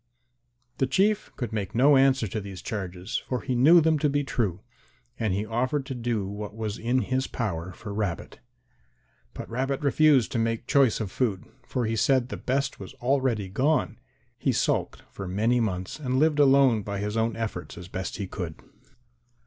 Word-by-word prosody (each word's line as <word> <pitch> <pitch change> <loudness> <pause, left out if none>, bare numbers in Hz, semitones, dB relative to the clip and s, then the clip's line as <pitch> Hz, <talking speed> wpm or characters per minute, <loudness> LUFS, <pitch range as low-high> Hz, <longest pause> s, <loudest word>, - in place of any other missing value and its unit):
The 135 - +2
Chief 200 +9 +1
could 120 -4 -4
make 100 -2 -3
no 140 +4 +6
answer 135 -3 +4
to 110 - -3
these 95 -2 -8
charges, 95 -3 -4
for 125 -1 -2
he 130 - -2
knew 145 +8 +7
them 160 -1 +3
to 150 - +2
be 145 +1 0
true, 105 -9 -1 0.6
and 110 -3 0
he 100 +3 -1
offered 125 +5 -1
to 135 - -5
do 115 -4 -2
what 105 +1 -6
was 110 -2 -4
in 125 +3 +1
his 130 0 -1
power 90 -7 -3
for 100 +2 -8
Rabbit. 100 -5 -3 1.0
But - - -6
Rabbit 130 +3 -2
refused 145 -3 +4
to 120 - -1
make 115 +1 -1
choice 130 -4 +3
of 100 -4 -4
food, 110 -8 -1 0.2
for 125 -3 -1
he 110 +1 -1
said 130 +2 +2
the - - -4
best 135 +1 -2
was 95 - -9
already 125 -5 0
gone. 135 +11 0 0.4
He - - +1
sulked - - 0
for 95 - -7
many 110 +7 +1
months 95 0 -2
and 130 -3 -1
lived 150 +1 +3
alone 135 -5 +5
by 100 0 -4
his 105 +2 -3
own 115 0 0
efforts 110 -7 -5
as 90 0 -8
best 95 0 -5
he 100 - -3
could. 90 -4 -5
115 Hz, 185 wpm, -26 LUFS, 100-135 Hz, 1.0 s, knew